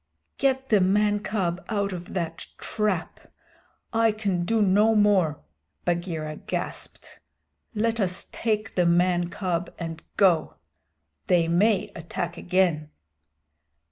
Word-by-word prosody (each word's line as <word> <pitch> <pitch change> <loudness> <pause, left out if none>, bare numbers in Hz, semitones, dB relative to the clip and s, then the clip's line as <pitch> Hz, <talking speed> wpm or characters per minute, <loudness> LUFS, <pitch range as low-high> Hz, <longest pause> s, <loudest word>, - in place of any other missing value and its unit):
"Get 265 -1 +1
the 210 -3 +4
man 205 +2 +3
cub 190 -3 -2
out 200 -3 -1
of 180 +1 -7
that 165 -2 -3
trap; 210 -6 -2 0.7
I 225 0 +4
can 200 -5 -1
do 225 +4 +1
no 210 +3 +4
more," 195 -8 +3 0.4
Bagheera 170 -3 -2
gasped. - - -5 0.6
"Let 230 +2 0
us 185 -2 0
take 215 -1 -1
the 180 -2 +2
man 175 0 +3
cub 175 -1 -2
and 165 -1 -6 0.2
go. 180 -6 +3 0.7
They 170 -2 +3
may 195 +5 +2
attack 170 +1 -4
again." 175 -4 +1
185 Hz, 115 wpm, -25 LUFS, 170-210 Hz, 0.7 s, the